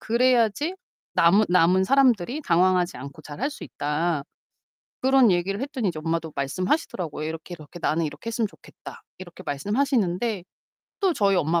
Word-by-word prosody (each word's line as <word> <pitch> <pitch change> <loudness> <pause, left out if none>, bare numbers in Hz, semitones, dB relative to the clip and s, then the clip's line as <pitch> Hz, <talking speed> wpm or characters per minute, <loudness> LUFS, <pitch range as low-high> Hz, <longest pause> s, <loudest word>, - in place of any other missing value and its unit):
그래야지 245 - +2 0.4
남은 195 +6 +5
남은 180 +1 +4
사람들이 255 - +3
당황하지 180 -1 +2
않고 140 +1 -10
잘할 215 - -4
수 300 - -9
있다. 150 +1 -2 0.8
그런 265 -3 +5
얘기를 190 +3 0
했더니 265 -6 -2
이제 160 -3 -4
엄마도 165 -1 -2
말씀하시더라고요. 165 - -2
이렇게, 165 +2 -7
이렇게 155 +3 -11
"나는 160 0 +1
이렇게 145 +10 -7
했으면 225 -2 -1
좋겠다." - - -13 0.2
이렇게 180 -2 -11
말씀하시는데. 205 - 0 0.6
또 385 -3 +3
저희 200 -7 +2
엄마 170 0 +2
185 Hz, 390 characters per minute, -24 LUFS, 165-235 Hz, 0.8 s, 남은